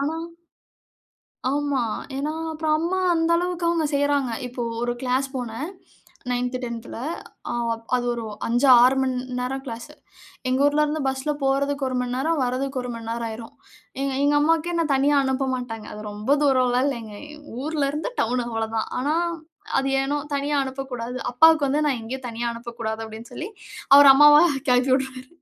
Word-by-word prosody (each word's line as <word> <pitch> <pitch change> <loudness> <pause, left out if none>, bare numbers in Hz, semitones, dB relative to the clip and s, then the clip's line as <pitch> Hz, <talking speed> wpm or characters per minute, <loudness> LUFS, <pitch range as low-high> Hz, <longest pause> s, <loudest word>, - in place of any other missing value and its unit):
ஆனா 305 +3 -1 1.4
ஆமா. 285 -3 0 0.4
ஏனா? 295 +2 -2 0.2
அப்போ 315 0 -4
அம்மா 350 +4 -1 0.2
அந்த 330 +1 +1
அளவுக்கு 355 -1 -2
அவுங்க 335 -2 +1
செய்றாங்க. 285 -2 +1 0.2
இப்போ 245 0 -6 0.2
ஒரு 240 0 0
க்ளாஸ் 260 +1 0
போனேன். 245 +5 -4 0.6
9த், 250 +1 -1
10த்ல 235 -1 -6 0.5
அ-அது 235 +1 -1
ஒரு 235 -1 -5 0.2
5 240 +4 +2 0.2
6 260 +2 +5
மணி 260 -1 0 0.2
நேரம் 265 +2 -3
கிளாஸ். 230 -1 -7 0.6
எங்க 260 +1 +1
ஊர்ல 295 +1 +3
இருந்து 300 0 -2
பஸ்ல 265 +3 -1
போறதுக்கு 280 +1 +1
ஒரு 255 - -3
மணி 250 0 -2
நேரம், 315 +4 0
வர்றதுக்கு 260 +2 -2
ஒரு 250 - -5
மணி 230 -1 -8
நேரம் 230 0 -2
ஆயிரும். 225 +1 -8 0.5
எ-எங்க 275 +2 +1
அம்மாவுக்கே, 325 +3 +2
என்ன 335 -1 +1
தனியா 285 +2 +3
அனுப்ப 265 0 0
மாட்டாங்க. 225 -3 -6
அது 210 - -8
ரொம்ப 215 +8 +1
தூரம்லாயில்லங்க, 255 -4 +1 0.2
எங்க 300 -1 -14 0.2
ஊர்ல 300 -3 0
இருந்து 305 +12 -3
டவுன் 245 +2 0
அவ்ளோதான். 225 -1 -2
ஆனா 290 +4 0 0.7
அது 270 - -1
ஏனோ 285 +2 -1 0.2
தனியா 285 +1 -1
அனுப்பக்கூடாது. 260 -2 -5 0.2
அப்பாவுக்கு 310 +2 +5
வந்து 295 +3 +1
நான் 260 -5 0
எங்கயும் 250 +2 -6
தனியா 235 +1 -3
அனுப்பக்கூடாது, 230 -1 -5
அப்டின்னு 220 +1 -10
சொல்லி, 360 +6 -5 0.5
அவர் 285 -1 +10
அம்மாவ 295 +1 +8 0.3
கிளப்பி 250 +1 +3
விட்ருவாரு. 260 -1 -6
265 Hz, 155 wpm, -24 LUFS, 240-290 Hz, 1.4 s, அவர்